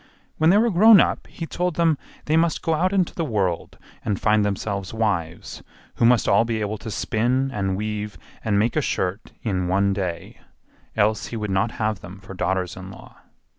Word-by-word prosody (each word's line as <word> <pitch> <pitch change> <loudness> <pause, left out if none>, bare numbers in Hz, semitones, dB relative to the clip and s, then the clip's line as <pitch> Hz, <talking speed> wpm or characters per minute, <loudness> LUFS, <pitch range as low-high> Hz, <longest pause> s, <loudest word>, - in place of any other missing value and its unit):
When 160 +1 +5
they 195 - +6
were 230 +2 +3
grown 210 +3 +8
up - - +1
he 165 - -7
told 180 +1 -2
them 165 -2 +3 0.3
they 155 - +1
must 165 -1 +2
go 165 - +1
out 180 +4 +1
into 190 -3 +1
the 170 - -2
world 100 - -2 0.3
and 100 -2 -1
find 105 -1 +3
themselves 100 0 -3
wives, 95 -7 -2 0.4
who 115 - +3
must 120 0 +4
all 115 - +5
be 115 -1 -2
able 105 0 -3
to 110 - -7
spin 125 +6 0
and 95 -2 -1
weave 105 0 -4 0.3
and 105 -3 +1
make 110 +4 +1
a 155 - +2
shirt 95 -5 -2
in 95 -5 -1
one 100 +2 +2
day, 90 -4 -4 0.6
else 110 0 +2
he 115 - -5
would 105 -2 -3
not 105 +5 +1
have 110 -3 -1
them 90 +3 -11
for 95 0 -10
daughters 95 -1 -1
in 95 0 -9
law. 95 - -13
110 Hz, 200 wpm, -23 LUFS, 95-135 Hz, 0.6 s, grown